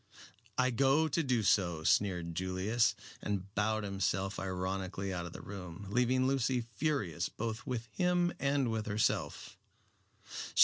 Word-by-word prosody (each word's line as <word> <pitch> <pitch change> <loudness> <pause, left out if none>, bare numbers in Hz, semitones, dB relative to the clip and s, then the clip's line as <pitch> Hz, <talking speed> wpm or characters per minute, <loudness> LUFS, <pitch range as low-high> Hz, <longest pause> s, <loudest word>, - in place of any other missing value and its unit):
"I 130 0 +3
go 135 +6 +4
to 160 +2 +1
do 125 -6 +1
so," 85 -6 +2
sneered 90 -1 +2
Julius, 95 +6 +1 0.3
and 100 -1 -3
bowed 110 +1 +1
himself 95 0 -1
ironically 95 +1 -2
out 85 -1 -3
of 85 - -10
the - - -9
room, 95 -1 -7
leaving 125 +2 +3
Lucy 130 -1 +2
furious 115 - -1
both 115 +1 -4
with 120 -3 -2
him 175 - +1
and 140 -3 +2
with 110 -1 -2
herself. 100 -6 -1
105 Hz, 135 wpm, -33 LUFS, 95-125 Hz, 0.3 s, go